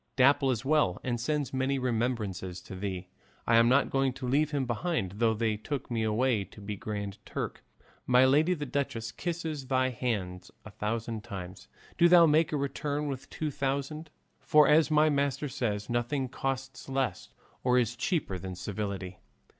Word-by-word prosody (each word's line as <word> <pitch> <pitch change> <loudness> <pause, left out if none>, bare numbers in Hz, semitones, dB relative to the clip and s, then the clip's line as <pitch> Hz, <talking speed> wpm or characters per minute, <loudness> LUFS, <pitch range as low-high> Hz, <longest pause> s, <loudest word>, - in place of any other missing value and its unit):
Dapple 135 +1 +4
is 125 0 -1
well 145 - +2
and 120 -2 -2
sends 145 +1 -1
many 130 +1 0
remembrances 110 -7 -2
to 95 - -9
thee; 95 -1 -4 0.4
I 115 - +4
am 115 +1 +6
not 140 +3 +3
going 135 -1 +1
to 130 -1 -6
leave 145 +4 +2
him 145 -3 -1
behind 120 - -1
though 110 0 +2
they 110 -1 0
took 135 +4 -5
me 115 -1 0
away 110 0 +1
to 100 +3 -15
be 105 +1 -5
Grand 100 0 -5
Turk. - - -5 0.4
My 125 +1 +6
lady 155 +7 +4
the 150 -3 -4
duchess 120 -4 -2
kisses 160 -3 -4
thy 130 0 +2
hands 100 -7 -3 0.2
a 110 - -9
thousand 110 +1 -3
times; 95 -5 -8 0.3
do 170 - +7
thou 175 -1 +8
make 155 +1 +3
a 150 - 0
return 145 +1 -2
with 135 -2 -6
two 155 -1 -3
thousand, 140 +4 -2 0.3
for 150 -2 +5
as 155 +1 +5
my 155 0 +4
master 140 -1 0
says, 105 -6 -2
nothing 120 +3 -1
costs 135 +1 -4
less 135 -2 -2 0.3
or 125 0 +3
is 120 -1 +1
cheaper 125 - -1
than 95 0 -6
civility. 95 -1 -5
125 Hz, 175 wpm, -29 LUFS, 105-140 Hz, 0.4 s, thou